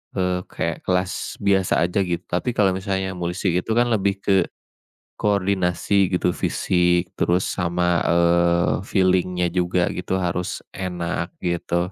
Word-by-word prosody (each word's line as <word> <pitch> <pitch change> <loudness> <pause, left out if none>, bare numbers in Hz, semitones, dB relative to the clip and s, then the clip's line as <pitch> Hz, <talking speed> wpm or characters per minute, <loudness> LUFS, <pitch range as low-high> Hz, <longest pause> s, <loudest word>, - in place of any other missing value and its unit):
eee, 90 -1 0
kayak - - -4
kelas 90 0 -1
biasa 95 -4 +2
aja 90 +3 0
gitu, 90 -2 -1
tapi 115 +7 -1
kalau 100 -2 +3
misalnya 95 0 -2
musik 90 +1 -2
itu, 90 - -5
kan, 120 0 +2
lebih 100 -2 0
ke 95 -3 +3 0.7
koordinasi 95 -2 +1
gitu, 90 - +1
fisik, 90 0 +1
terus 90 +2 +2
sama, 90 0 0
eee, 85 0 +3
feeling-nya 90 -2 +1
juga 90 0 +1
gitu 90 +1 -3
harus 90 -1 -2
enak 85 -3 -4
gitu. 85 0 -1
90 Hz, 130 wpm, -22 LUFS, 85-95 Hz, 0.7 s, kalau